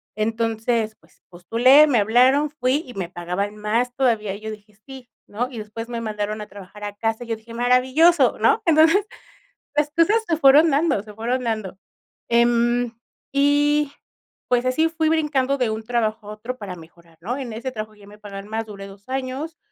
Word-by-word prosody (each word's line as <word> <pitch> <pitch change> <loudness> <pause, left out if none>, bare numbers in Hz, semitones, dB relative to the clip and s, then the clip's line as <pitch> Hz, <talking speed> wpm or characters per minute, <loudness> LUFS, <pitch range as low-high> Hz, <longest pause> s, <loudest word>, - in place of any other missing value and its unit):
Entonces, 225 0 -1
pues, - - -27
postulé, 240 - +5
me 255 -5 +2
hablaron, 255 +8 +4
fui 275 +1 0
y 250 - -10
me 185 -3 -4
pagaban 180 +4 -4
más 230 +4 -1
todavía, 225 -7 +1
y 200 - -8
yo 220 0 -7
dije: 210 -1 -13
"Sí", 265 -2 -12 0.2
¿no? 245 +5 -3
Y 240 - -9
después 225 +2 -7
me 235 -1 -4
mandaron 215 -1 -3
a 210 - -7
trabajar 205 +1 -11
a 205 - -6
casa, 225 +2 -2
y - - -16
yo 225 - -1
dije: 225 +1 -14
"Maravilloso", 255 +5 +3
¿no? - - +3
Entonces, 325 +5 +4 0.7
las 295 0 +1
cosas 335 +8 +3
se 330 -2 0
fueron 295 +3 +6
dando, 285 -6 +1
se 210 0 -12
fueron 240 +4 -2
dando. 215 -5 -3 0.5
Em, 235 0 +2 0.4
y, 290 +1 +2 0.6
pues, 245 0 +2
así 315 +6 +2
fui 320 -1 -1
brincando 290 -4 +1
de 250 -4 0
un 220 0 -4
trabajo 220 -2 -2
a - - -5
otro 230 +4 -7
para 200 -6 -7
mejorar, 165 0 -17
¿no? 240 +9 -3
En 245 -5 -6
ese 250 +4 -5
trabajo 215 -2 -7
ya 205 -1 -17
me 210 +1 -14
pagaban 200 0 -9
más, 225 +1 -3
duré 200 -2 -9
2 195 +1 -15
años. 265 +5 -4
235 Hz, 190 wpm, -22 LUFS, 210-270 Hz, 0.7 s, fueron